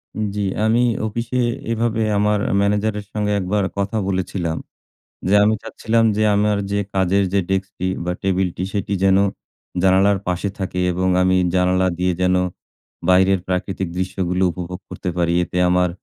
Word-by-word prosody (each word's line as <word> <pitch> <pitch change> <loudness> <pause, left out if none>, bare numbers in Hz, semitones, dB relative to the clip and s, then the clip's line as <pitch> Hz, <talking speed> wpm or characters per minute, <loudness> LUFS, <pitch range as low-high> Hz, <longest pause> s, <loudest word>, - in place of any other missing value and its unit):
উম, 110 - -1
জ্বি। 105 -1 -1 0.2
আমি 115 +2 +3 0.3
অফিসে 115 +3 -3 0.3
এভাবে 115 0 0 0.2
আমার 105 0 +2 0.2
ম্যানেজারের 105 +1 0
সঙ্গে 105 -1 -1
একবার 100 +2 0
কথা 100 +3 -1
বলেছিলাম 90 -3 -2 0.7
যে, 100 - +2
"আমি 105 +1 +4
চাচ্ছিলাম 115 0 0
যে 110 - +2
আমার 105 0 +2
যে 100 - +1
কাজের 95 +1 +2
যে 100 - +3
ডেস্কটি 95 -1 -2 0.2
বা 90 - 0
টেবিলটি 95 -2 0
সেটি 100 0 -2
যেন 95 0 +5 0.7
জানালার 95 +1 +4
পাশে 90 +2 -1
থাকে 90 -1 -3
এবং 90 +1 -1
আমি 95 0 +3 0.2
জানালা 90 0 +2
দিয়ে 90 0 +1
যেন 90 0 +3 0.7
বাইরের 95 +1 +4
প্রাকৃতিক 95 0 -2
দৃশ্যগুলো 95 -1 -1
উপভোগ 90 +1 -6
করতে 90 - -4
পারি। 85 -1 +1
এতে 90 - -5
আমার, 90 0 +3
95 Hz, 150 wpm, -20 LUFS, 90-105 Hz, 0.7 s, যেন